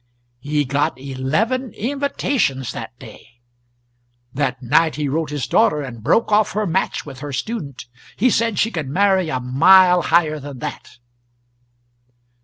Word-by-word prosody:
He 145 +2 -1
got 145 +3 -1
eleven 155 - -2
invitations 255 - -1
that 120 +1 -8
day. 115 0 -15 0.9
That 135 -1 -1
night 150 +6 +2
he 150 0 -2
wrote 155 +2 -2
his 145 -4 -3
daughter 150 -1 +2
and 120 -4 -8
broke 165 - +1
off 210 0 +3
her 215 +1 -1
match 190 +1 -1
with 130 - -10
her 145 0 -6
student. 140 - -5 0.3
He 250 +4 +2
said 230 -2 0
she 225 - +1
could 155 -8 -4
marry 190 +1 +2
a 130 - -1
mile 180 +8 +5
higher 160 -3 +2
than 140 -1 -9
that. 120 - -8
150 Hz, 145 wpm, -20 LUFS, 135-195 Hz, 0.9 s, mile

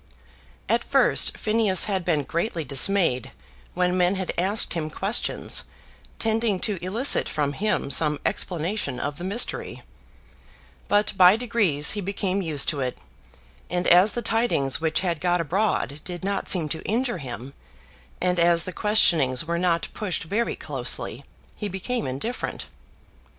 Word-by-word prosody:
At - - +1
first, - - +2
Phineas 215 -4 +2
had 195 -3 -1
been 160 -4 0
greatly 170 +3 -2
dismayed 140 - +1 0.5
when 180 0 +1
men 180 +1 +2
had 190 -1 -3
asked 195 +5 0
him 160 -2 -3
questions 195 +8 -1 0.5
tending 220 -3 0
to 195 -5 -1
elicit 225 +9 +2
from 145 -2 -1
him 200 -5 -1
some 150 +1 +1
explanation 175 -5 -2
of 145 +4 -4
the - - -6
mystery; 200 +6 -1 1.0
but 205 +1 +2
by 185 +1 +7
degrees 215 -11 +2
he 205 - -2
became 195 0 -2
used 155 -6 0
to 150 - -3
it, 130 -2 -3 0.7
and 180 +1 -1
as 180 +4 +6
the 240 - -3
tidings 215 - +1
which 160 -1 0
had 170 -4 -2
got 175 0 +1
abroad 170 -3 -1
did 180 0 -7
not 200 0 -2
seem 170 -5 +4
to 160 - -4
injure 240 -2 -1
him, 130 0 -7 0.7
and 180 -1 0
as 170 -1 +4
the 185 - -6
questionings 165 - +3
were 170 +1 -2
not 170 -2 +1
pushed 195 -5 -2
very 210 +8 -1
closely, - - -5 0.3
he 210 - -4
became 220 +6 -3
indifferent. 140 - -4
180 Hz, 145 wpm, -24 LUFS, 160-205 Hz, 1.0 s, by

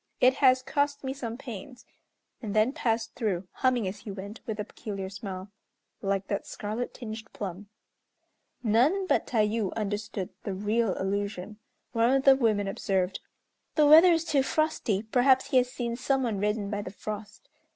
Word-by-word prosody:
It 255 +1 +6
has 255 -2 +5
cost 285 +1 0
me 265 0 -2
some 235 -4 -5
pains," 250 -1 -9 0.6
and 215 -3 -4
then 215 +5 +3
passed 225 -6 -1
through, 195 -6 -2
humming 250 -5 +1
as 195 +2 -5
he 210 - -9
went, 200 +2 -7
with 220 -1 -3
a - - 0
peculiar 195 -3 -6
smile, 190 0 -7 0.5
"Like 195 -1 0
that 200 0 -3
scarlet 220 +4 -4
tinged 220 -2 -8
plum." 200 0 -6 1.0
None 255 - +3
but - - +1
Tayû 215 -3 +1
understood 205 -2 -3
the 195 - -4
real 210 +1 +1
allusion. 200 +1 -3 0.3
One 230 0 +3
of 270 +1 +3
the 270 -1 +8
women 215 -6 +1
observed, 190 -1 -1 0.6
"The 305 - +5
weather 320 +5 +9
is 330 0 0
too 290 -4 +3
frosty, 270 -9 0
perhaps 255 +3 +3
he 260 - +5
has 250 0 +3
seen 235 -2 -3
some 265 +2 0
one 220 -5 -1
reddened 210 0 -1
by 205 0 -1
the 200 - -6
frost." 210 +1 -7
220 Hz, 170 wpm, -28 LUFS, 200-255 Hz, 1.0 s, weather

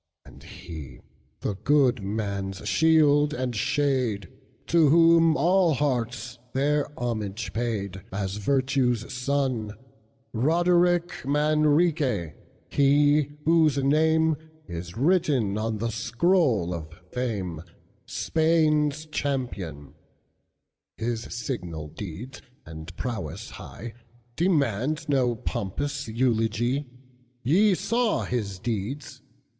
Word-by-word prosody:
And - - -15
he, 75 -8 -10 0.4
the - - -1
good 130 +2 +2
man's 100 -1 -3
shield 150 -2 +4
and 125 -3 -2
shade, 125 -5 0 0.4
To 165 -4 +4
whom 165 0 +5
all 175 +1 +3
hearts 125 -3 -2
their 145 +2 +1
homage 110 -5 -3
paid, 100 -4 -3
As 95 0 -3
Virtue's 130 0 0
son, 125 -4 -1 0.6
Roderic 175 +6 +2
Manrique, 150 - +2 0.3
he 145 +1 +3 0.2
whose 160 -3 +4
nameIs 155 - 0
written 135 - +2
on 110 0 -2
the 115 +2 -2
scroll 115 - +1
of 80 -3 -5 0.2
Fame, 100 -10 -3 0.5
Spain's 155 -2 +1
champion; 100 - -4 1.0
His 115 0 -2
signal 90 - -5
deeds 105 - -8 0.2
and 80 +1 -9
prowess 110 - -5
highDemand 120 - -3
no 125 -4 +2
pompous 140 +8 -3
eulogy, 120 +3 0 0.6
Ye 190 - +4
saw 230 +4 0
his 105 -6 -3
deeds! 120 +7 -4
125 Hz, 90 wpm, -26 LUFS, 105-150 Hz, 1.0 s, whom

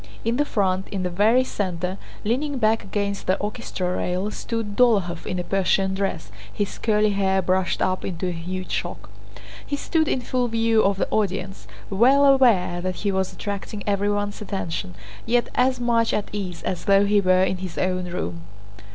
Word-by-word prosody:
In 230 +2 +1
the 295 - +2
front, 190 -6 0
in 195 -2 -3
the 180 - -2
very 220 +8 +4
center, 185 -5 -3 0.2
leaning 270 +6 -1
back 225 -1 +2
against 200 0 -3
the 185 - +3
orchestra 185 -3 -3
rail, 185 +4 -1
stood 225 -3 -4
Dólokhov 200 -9 +2
in 180 - -2
a 180 - -2
Persian 190 0 +1
dress, 190 - -3 0.2
his 205 - -3
curly 215 -1 +2
hair 195 -1 +1
brushed 185 0 +1
up 185 0 0
into 185 0 -3
a - - -1
huge 180 +2 -5
shock. - - -4 0.5
He 285 - -3
stood 315 +2 0
in 260 - 0
full 250 0 0
view 225 -1 +2
of 195 0 +2
the - - 0
audience, 195 -2 -2 0.2
well 260 +8 +5
aware 230 -11 +4
that 185 0 -2
he 200 - +3
was 190 -1 0
attracting 205 +1 -5
everyone's 205 0 0
attention, 170 - -4 0.3
yet 240 +1 +2
as 255 0 +2
much 235 -1 +2
at 210 - -2
ease 190 -4 -5
as 180 - -3
though 200 0 +5
he 205 0 +3
were 185 -1 +4
in 190 0 0
his 185 -2 -7
own 185 0 0
room. 90 - -4
200 Hz, 180 wpm, -23 LUFS, 185-225 Hz, 0.5 s, well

